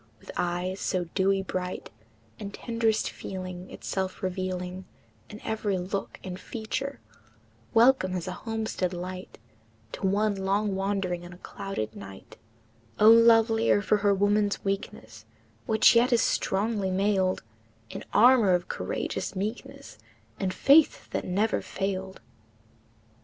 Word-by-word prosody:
With - - -11
eyes 180 +2 -2
so 185 -1 -1
dewy 195 0 +2
bright, 180 - -5 0.5
And 200 - -6
tenderest 230 -1 -1
feeling 185 -1 -7
Itself 190 -1 -4
revealing 185 0 -3 0.4
In 210 - -9
every 215 -3 -1
look 190 +2 -4
and 185 0 -6
feature, 260 +7 -5 0.8
Welcome 225 -6 +4
as 180 -1 -4
a - - -2
homestead 220 -2 -3
light 185 +1 -7 0.5
To 195 - -2
one 205 +2 +2
long 200 +1 0
wandering 195 -2 -1
in 175 0 -10
a - - -13
clouded 180 - -5
night, 100 -1 -11 0.6
O, 215 +1 +8
lovelier 225 -1 +5
for 210 - +3
her 205 0 +2
woman's 205 +1 +1
weakness, 195 0 -5 0.4
Which 220 +1 +5
yet 240 +2 +4
is 240 - +4
strongly 200 0 0
mailed 190 -1 +1 0.5
In - - -7
armor 230 -5 +6
of 175 0 -3
courageous - - -3
meekness 210 +5 -6 0.4
And 190 -2 -1
faith 280 +10 +4
that - - -2
never 205 +5 0
failed! 190 -1 -4
195 Hz, 125 wpm, -27 LUFS, 185-215 Hz, 0.8 s, O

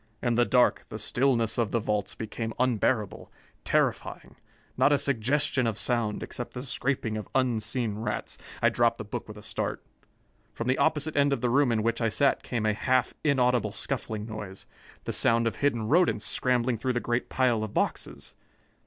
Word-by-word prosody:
In 120 - 0
the 120 +1 +3
dark, 125 0 +3
the - - -6
stillness 120 -4 +1
of 115 -3 +1
the 115 - 0
vaults 105 -2 -2
became 110 0 -5
unbearable, 120 -3 0 0.3
terrifying. - - -1 0.4
Not 145 - +4
a 145 - +5
suggestion 135 0 +1
of 110 -2 -2
sound, 115 -4 -1
except 120 - -6
the 125 - -5
scraping 130 -4 -2
of 105 - -7
unseen 115 -3 0
rats 110 - -4
" - - -15
I - - +6
dropped - - +2
the - - -5
book - - -6
with - - -10
a - - -11
start. - - -3 0.7
From 115 - -4
the 130 - +1
opposite 155 -1 +1
end 140 0 +3
of - - -2
the 125 -2 +1
room 140 -1 +3
in 110 -2 +1
which 115 +1 0
I 115 - +2
sat 140 +5 +2
came 115 -3 -3
a 110 - +2
half 125 +3 +1
inaudible 125 -7 +2
scuffling 110 -4 -3
noise 105 -4 -8 0.4
the - - -4
sound 115 0 +3
of 115 - -1
hidden 120 -6 0
rodents 175 +8 +3
scrambling 125 -2 +1
through 130 +1 -1
the 120 - 0
great 120 0 -2
pile 120 -4 +1
of 110 - -6
boxes. - - -2
120 Hz, 190 wpm, -27 LUFS, 110-130 Hz, 0.7 s, I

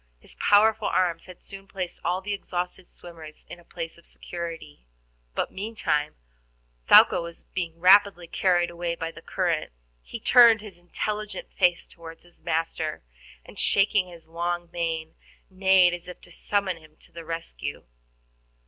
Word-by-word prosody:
His - - -11
powerful 215 +1 +3
arms 170 -3 0
had 180 -1 -13
soon 195 0 -10
placed 185 -2 -6
all 180 +2 0
the 205 +1 -3
exhausted 180 -2 -5
swimmers 160 -3 -13
in 175 - -10
a - - -18
place 165 0 -7
of - - -22
security. 165 - -8 0.5
But, - - -1
meantime, 190 -8 -2 0.7
Thaouka - - +7
was 170 0 -9
being 170 -3 -4
rapidly 190 0 +5
carried 175 0 +1
away 170 0 -3
by 165 0 -4
the - - -13
current. 175 - -1 0.3
He - - -8
turned 235 -2 +7
his 205 -4 -12
intelligent 210 +3 -5
face 180 -2 +2
toward 165 -1 -13
his 175 0 -24
master, 160 - -2 0.4
and, - - -11
shaking 200 -1 +2
his 170 -2 -14
long 175 +1 -3
mane, 165 -2 -3 0.4
neighed 190 -1 +4
as 175 0 -7
if 180 - -9
to 175 - -18
summon 195 0 -1
him 155 -1 -19
to - - -11
his 165 0 -8
rescue. 165 - -6
175 Hz, 155 wpm, -26 LUFS, 165-190 Hz, 0.7 s, Thaouka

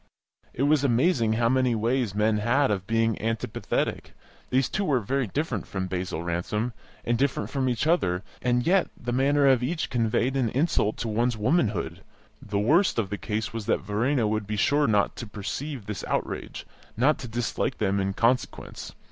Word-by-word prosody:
It 130 - -2
was 145 0 +3
amazing 120 -3 +2
how 115 +1 +2
many 130 -1 +2
ways 115 -1 0
men 105 +1 +2
had 120 +4 +2
of 95 -2 -2
being 115 -1 +1
antipathetic; 115 0 -2 0.3
these 130 0 +2
two 200 - -2
were 140 -9 +2
very 130 +3 -1
different 135 -1 -2
from 95 -1 -3
Basil 90 -2 -3
Ransom, 100 +8 -2 0.3
and 120 0 +1
different 140 +2 0
from 135 -2 0
each 120 +2 -1
other, 100 - +1 0.2
and 125 0 +1
yet 185 +2 +3
the 120 - -4
manner 140 +3 +3
of 130 -3 +5
each 155 +6 -2
conveyed 120 +2 +1
an 130 -4 +1
insult 130 -5 +1
to 120 - -3
one's 115 +2 0
womanhood. 110 - 0 0.4
The 105 -1 -3
worst 155 - +3
of 105 -4 -1
the 105 - -2
case 110 0 -3
was 115 -3 -5
that - - +1
Verena 110 +6 0
would 110 -1 -1
be 105 0 -2
sure 145 +7 +3
not 105 -2 +2
to 120 - -6
perceive 115 +5 -5
this 105 -2 -5
outrage - - -3 0.3
not 140 +6 +3
to 125 - -6
dislike 120 +3 -2
them 100 -2 +1
in 95 0 -1
consequence. 120 +5 -1
115 Hz, 180 wpm, -26 LUFS, 105-135 Hz, 0.4 s, of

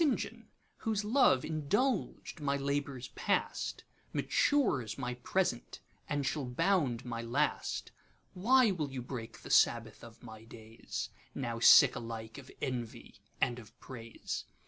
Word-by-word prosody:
JOHN, 300 -5 0 0.3
whose 215 -2 -1
love 215 - +4
indulged 180 - -1
my 140 -1 +1
labours 140 -2 -2
past, - - -1 0.3
Matures 135 - +1
my 125 -2 -3
present, 125 +1 -1 0.3
and 145 -1 -1
shall 150 +1 -1
bound 140 -3 +1
my 115 -1 -4
last, 130 +6 -1 0.4
Why 240 +4 +4
will 155 -6 -2
you 130 -2 -5
break 120 -3 -7
the - - -7
Sabbath 115 -2 +3
of 115 +1 -13
my 110 -2 -10
days? 115 0 -7 0.3
Now 120 -3 -3
sick 125 +3 +8
alike 115 0 -6
of 135 - -13
envy 125 -4 -5 0.2
and 120 0 +1
of 110 -1 -15
praise. 115 -3 -6
130 Hz, 130 wpm, -32 LUFS, 115-155 Hz, 0.4 s, sick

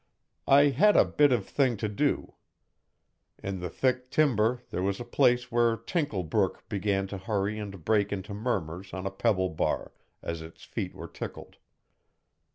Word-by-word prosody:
I 145 +1 +7
had 205 +9 +4
a - - +7
bit 145 -2 +3
of 115 -6 +1
think 130 -5 +1
to 110 - +1
do. 140 +8 -1 1.1
In 95 -1 -3
the 90 0 -4
thick 125 +6 0
timber 125 -5 +2
there 90 - -2
was 100 +1 -1
a 120 - -5
place 125 0 +2
where 120 -1 +3
Tinkle 115 - -2
brook 80 - -1
began 100 -1 0
to 95 0 -6
hurry 100 +1 -1
and 100 -5 -7
break 105 -2 +2
into 100 0 -4
murmurs 95 -5 -3
on 95 0 -5
a 95 - -1
pebble 95 -2 +1
bar, 80 - -2 0.3
as 85 -1 -4
if 80 +1 -9
its - - -18
feet - - -5
were - - -7
tickled. - - -8
105 Hz, 170 wpm, -28 LUFS, 95-125 Hz, 1.1 s, I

